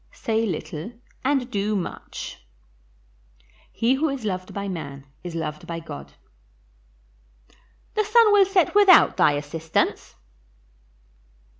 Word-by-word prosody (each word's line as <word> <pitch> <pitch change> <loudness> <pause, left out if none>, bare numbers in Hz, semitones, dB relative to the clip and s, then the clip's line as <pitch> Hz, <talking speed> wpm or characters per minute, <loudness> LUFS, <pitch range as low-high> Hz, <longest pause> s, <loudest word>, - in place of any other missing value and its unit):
Say 225 0 -1
little 165 +3 -5 0.3
and 265 -2 0
do 210 0 -1
much. 180 - -6 1.3
He 235 +3 +1
who 300 +4 +1
is 270 -5 -4
loved 185 -2 -3
by 200 0 -4
man 140 -7 -6 0.2
is 175 -2 -6
loved 155 -2 -5
by 170 -1 -4
God. 70 - -9 1.8
The 430 - +1
sun 430 0 +5
will 400 -1 +6
set 380 -3 +2
without 400 -4 +7
thy 145 - +4
assistance. 155 +3 -2
200 Hz, 115 wpm, -24 LUFS, -, 1.8 s, without